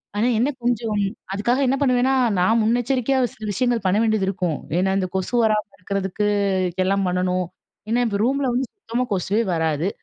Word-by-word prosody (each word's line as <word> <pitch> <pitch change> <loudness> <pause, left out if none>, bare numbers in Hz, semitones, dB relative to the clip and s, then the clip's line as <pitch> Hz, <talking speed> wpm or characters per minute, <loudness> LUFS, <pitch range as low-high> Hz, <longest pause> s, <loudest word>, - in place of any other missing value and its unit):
ஆனா, 215 +4 +2
என்ன 255 - +2
கொஞ்சம் 230 -3 0 0.4
அதுக்காக 235 +6 +1
என்ன 265 - +2
பண்ணுவேன்னா 255 0 +3 0.3
நான் 225 +6 +3
முன்னெச்சரிக்கையா 245 +3 +1
சில 220 - -14
விஷயங்கள் 235 0 0
பண்ண 185 +2 +3
வேண்டியது 215 -3 +1
இருக்கும். 180 -5 -1 0.2
ஏன்னா, 190 +1 +1
இந்த 185 - -1
கொசு 190 +5 -2
வராம 215 -1 +2
இருக்கிறதுக்கு 195 +1 -2 0.6
எல்லாம் 195 +1 +1
பண்ணணும். 180 0 0 0.4
ஏன்னா, 245 +2 +2
இப்போ 200 -2 -2
ரூம்ல 275 +2 +1
வந்து 255 0 0
சுத்தமா 250 - -3
கொசுவே 200 +4 0
வராது. 160 +1 0
215 Hz, 160 wpm, -22 LUFS, 190-245 Hz, 0.6 s, பண்ணுவேன்னா